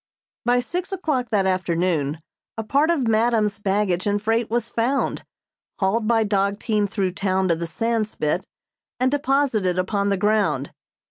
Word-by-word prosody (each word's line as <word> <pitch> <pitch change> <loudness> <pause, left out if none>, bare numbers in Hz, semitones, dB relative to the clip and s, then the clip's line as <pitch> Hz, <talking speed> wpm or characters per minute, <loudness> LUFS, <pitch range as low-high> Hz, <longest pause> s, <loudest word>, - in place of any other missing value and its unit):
By 245 +1 +3
six 360 +8 -4
o'clock 300 -10 -1
that 205 -4 +2
afternoon 170 -5 0 0.4
a 225 - -2
part 280 +8 +2
of 290 -8 +1
madam's 220 -2 +2
baggage 195 -2 0
and 205 0 +1
freight 225 +2 0
was 235 0 0
found, 240 +4 -1 0.5
hauled 215 +3 0
by 225 -1 +3
dog 200 -1 +1
team 210 -2 0
through 195 -2 -1
town 190 0 0
to 170 - +3
the 170 +1 -4
Sandspit 215 -3 -1 0.6
and 255 +1 +2
deposited 270 - +1
upon 200 +2 0
the 200 - +1
ground. 195 -10 +1
210 Hz, 150 wpm, -23 LUFS, 190-235 Hz, 0.6 s, By